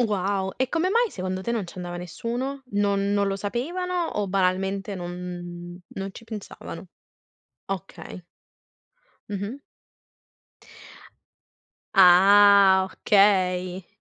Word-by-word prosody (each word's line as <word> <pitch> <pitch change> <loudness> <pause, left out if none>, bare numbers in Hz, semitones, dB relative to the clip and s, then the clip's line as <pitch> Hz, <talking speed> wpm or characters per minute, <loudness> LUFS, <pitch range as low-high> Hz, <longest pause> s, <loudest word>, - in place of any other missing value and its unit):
Wow! 195 -3 0
E 260 0 0
come 345 +2 0
mai 470 +1 +2
secondo 185 0 -4
te 235 - -3
non 225 -5 -2
ci - - -12
andava 175 -1 -6
nessuno? 240 - -5
Non 200 0 0
non 200 0 +1
lo 195 - -1
sapevano 335 - -2
o 205 -1 -1
banalmente 195 +1 0
non 175 -1 -7
non 195 0 -6
ci - - -12
pensavano? 220 -3 -9 0.8
Okay. 195 -1 -7 1.1
Mh-mh. 205 +5 -5 2.4
Ah, 195 +1 +7
okay. 185 -3 +2
195 Hz, 105 wpm, -25 LUFS, 185-210 Hz, 2.4 s, Ah